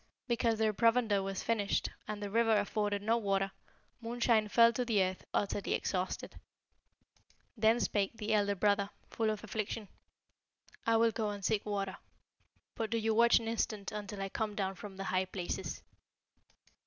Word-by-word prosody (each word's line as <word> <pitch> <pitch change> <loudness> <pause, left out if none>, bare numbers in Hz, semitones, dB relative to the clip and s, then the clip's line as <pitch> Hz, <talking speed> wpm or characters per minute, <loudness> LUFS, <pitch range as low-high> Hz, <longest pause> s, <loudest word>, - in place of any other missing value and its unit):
Because 230 -2 +1
their 220 -1 +2
provender 230 -2 +3
was 195 0 -3
finished, 210 -3 0 0.2
and 210 -1 -4
the 200 - -4
river 225 0 +4
afforded 205 0 -1
no 225 +2 +3
water, 195 -3 0 0.5
Moonshine 230 -2 +2
fell 230 +2 +6
to 250 - 0
the 220 -5 +2
earth 185 0 -3
utterly 200 0 0
exhausted. 185 -1 -3 1.2
Then 220 +1 +4
spake 205 0 0
the 220 0 -1
elder 205 -1 +2
brother, 200 +1 +2 0.2
full 225 -1 0
of 215 0 -3
affliction, 215 -1 -4 1.0
'I 230 0 +5
will 230 0 +4
go 220 -1 -1
and 200 -2 -5
seek 215 -1 0
water; 195 -2 -2 0.8
but 225 -2 -3
do 230 - 0
you 220 0 +1
watch 235 +1 +6
an 230 - -3
instant 215 -3 -2
until 205 -1 -5
I 195 - -3
come 215 0 -2
down 195 -2 -1
from 195 0 -10
the 195 - -4
high 185 -1 0
places.' 185 -2 -4
210 Hz, 165 wpm, -33 LUFS, 200-225 Hz, 1.2 s, fell